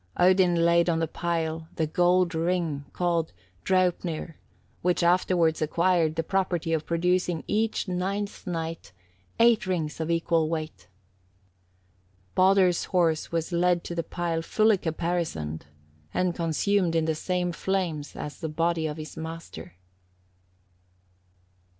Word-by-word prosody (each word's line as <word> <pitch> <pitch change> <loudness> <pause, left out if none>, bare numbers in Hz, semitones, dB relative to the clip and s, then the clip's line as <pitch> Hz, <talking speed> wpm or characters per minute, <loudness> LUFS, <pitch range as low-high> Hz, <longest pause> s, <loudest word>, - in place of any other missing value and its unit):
Odin 180 -1 +4
laid 170 +1 +4
on 165 - +2
the 165 0 0
pile 165 -1 -2
the 160 - 0
gold 180 +2 +2
ring 165 -3 -1
called 170 -2 -1 0.3
Draupnir, 180 -3 0 0.5
which 180 0 +1
afterwards 170 -2 +2
acquired 165 0 +2
the 165 - -1
property 175 -3 -1
of 160 -1 -1
producing 175 0 0
every 220 +2 +1 0.3
ninth 200 +3 -3
night 165 - -4 0.5
eight 230 -4 +4
rings 165 -5 -2
of 160 0 -2
equal 165 -1 +1
weight. 155 - -5 1.5
Baldur's 185 -1 +4
horse 165 -4 +1
was 165 +1 -2
led 175 0 +2
to - - -5
the 170 - -1
pile 165 -1 -2
fully 215 +4 +3
caparisoned, 160 - -3 0.5
and 180 -1 +1
consumed 170 +2 +1
in 165 -1 +2
the 160 - +1
same 180 +2 -1
flames 170 -5 -2
on 150 - -5
the 160 - -3
body 165 +1 0
of 150 0 -5
his 155 -1 -8
master. 160 - -8
170 Hz, 125 wpm, -26 LUFS, 160-180 Hz, 1.5 s, Odin